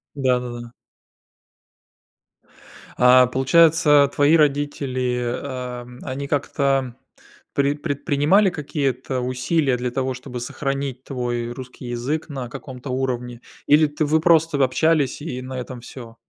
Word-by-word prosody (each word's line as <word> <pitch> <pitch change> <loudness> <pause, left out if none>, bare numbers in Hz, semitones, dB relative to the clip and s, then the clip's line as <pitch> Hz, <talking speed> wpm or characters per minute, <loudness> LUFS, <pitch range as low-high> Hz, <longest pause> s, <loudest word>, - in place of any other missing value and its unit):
Да-да-да. 125 -3 -1 2.3
А 125 +1 +7
получается, 150 +2 +4
твои 145 +3 +4
родители, 140 -4 0 0.2
ам, 125 -2 -7
они 140 +1 -5
как-то 135 -3 0 0.6
пред 140 +1 0
предпринимали 145 +6 +2
какие-то 135 -5 -2
усилия 130 +2 0
для 125 0 -2
того, 130 +1 -1
чтобы 125 0 -7
сохранить 135 +1 -4
твой 120 -3 -3
русский 125 +1 -9
язык 125 +7 -3
на 130 -4 -5
каком-то 130 +2 -9
уровне, 125 -2 -3 0.3
или 150 +1 +5
ты 150 +1 -2
вы 155 +2 +2
просто 160 -3 +3
общались, 145 +2 +1
и 130 -5 -5
на 130 0 -6
этом 125 -1 -7
всё? 115 -1 -11
130 Hz, 115 wpm, -22 LUFS, 125-145 Hz, 2.3 s, А